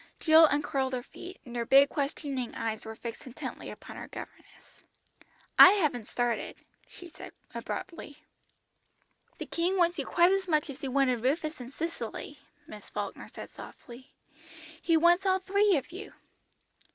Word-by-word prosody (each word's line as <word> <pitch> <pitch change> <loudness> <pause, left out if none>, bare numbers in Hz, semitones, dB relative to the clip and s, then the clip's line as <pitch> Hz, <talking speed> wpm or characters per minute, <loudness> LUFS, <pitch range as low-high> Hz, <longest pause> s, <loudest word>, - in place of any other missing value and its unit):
Jill 320 0 +7
uncurled 285 -3 -1
her 250 -1 -2
feet, 360 +7 -11
and 240 -1 -9
her 235 - 0
big 275 +4 +6
questioning 275 -3 -3
eyes 225 -1 -3
were 220 0 -7
fixed 230 +2 -8
intently 250 - -7
upon - - -10
her - - -7
governess. - - -12 0.8
"I 375 - +11
haven't 290 - 0
started," 240 -1 -2 0.3
she 355 - -12
said 340 - -11 0.2
abruptly. 330 -5 -6 1.2
"The - - -5
King 355 +3 -1
wants 345 -2 +2
you 275 - -3
quite 345 +2 +4
as 390 -1 0
much 305 -3 +1
as 280 - -12
He 275 - -3
wanted 255 -3 +1
Rufus 305 +3 -1
and 245 +1 -9
Cicely," 330 +4 -5 0.3
Miss - - -11
Falkner - - -5
said - - -10
softly; 245 +2 -12 0.7
"He 330 -1 +3
wants 345 +4 +4
all 375 0 +4
three 395 0 +2
of 275 +4 -5
you." 395 +4 -8
295 Hz, 155 wpm, -29 LUFS, 255-345 Hz, 1.2 s, I